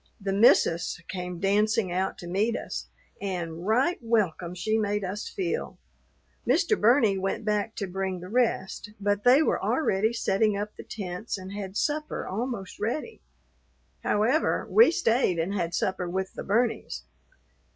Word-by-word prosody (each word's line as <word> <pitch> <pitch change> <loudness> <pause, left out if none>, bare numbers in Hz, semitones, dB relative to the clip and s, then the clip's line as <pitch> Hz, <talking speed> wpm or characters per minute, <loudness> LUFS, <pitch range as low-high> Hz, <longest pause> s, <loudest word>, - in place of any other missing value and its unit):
"The 195 -1 -2
missus" 195 -6 +4
came 180 -2 -5
dancing 205 +1 +2
out 185 +2 -1
to 175 - -9
meet 205 +6 +1
us, - - -5 0.3
and 175 -3 -4
right 260 +11 +2
welcome 190 -7 0
she 215 +5 0
made 205 -1 0
us 195 +3 -4
feel. 395 +4 -3 0.7
Mr. 430 - +3
Burney 225 - +4
went 195 +3 -2
back 210 +1 0
to 205 - -2
bring 190 0 -3
the 180 - -8
rest, 210 -2 -1
but 205 0 0
they 260 +5 +6
were - - 0
already 220 -7 +1
setting 210 -2 +1
up 210 +1 -4
the - - -9
tents 200 +1 -5
and 190 0 -8
had 200 -1 -5
supper 300 0 -1
almost 215 -1 -4
ready. 300 - -3 0.8
However, 235 +10 +2
we 450 -3 +7
stayed 230 - +2
and 170 +4 -1
had 170 -3 -1
supper 185 -1 -1
with 190 +1 -3
the - - -6
Burneys. 210 - 0
205 Hz, 150 wpm, -27 LUFS, 185-230 Hz, 0.8 s, we